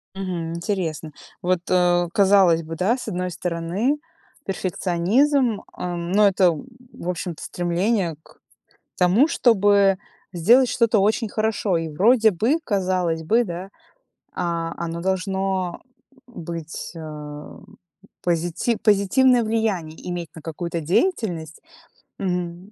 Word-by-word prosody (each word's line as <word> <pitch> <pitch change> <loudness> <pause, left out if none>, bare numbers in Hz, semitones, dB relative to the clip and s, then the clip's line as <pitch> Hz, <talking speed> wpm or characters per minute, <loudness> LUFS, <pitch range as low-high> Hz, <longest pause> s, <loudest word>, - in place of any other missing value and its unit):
Мгм. 180 -4 -4
Интересно, 170 -4 -3 0.3
вот, 180 0 +1
э, 175 -1 +3
казалось 190 -4 +5
бы, 165 +1 -6
да, 195 +9 +1
с 245 - -8
одной 180 0 -3
стороны, 180 - -1 0.5
перфекционизм, 200 - +1
а, 180 -1 -4
но 180 +5 +3
это, 195 -1 +3
м, 170 +1 +1 0.3
в 175 - -7
общем-то 175 -2 -4
стремление 175 +1 -1
к - - -22 0.6
тому, 185 - +4
чтобы 200 -7 +4 0.4
сделать 235 +9 +5
что-то 230 -2 +2
очень 215 +3 +1
хорошо. 215 -4 0
И 165 -1 -3
вроде 220 +8 +4
бы, 225 - +1
казалось 185 - 0
бы, 225 +9 +3
да, 180 -1 -6 0.6
а, 165 -1 -2
оно 170 0 -4
должно, 190 -1 -1 0.5
м, 240 -9 -10
быть, 165 -1 -6
ам, 150 -2 -9 0.6
позити 175 +6 0
позитивное 230 +5 +3
влияние 210 -8 -1
иметь 175 -2 -4
на 160 - -11
какую-то 170 +2 -4
деятельность. 170 - -1 0.6
Мгм. 180 0 -3
180 Hz, 120 wpm, -22 LUFS, 170-210 Hz, 0.6 s, казалось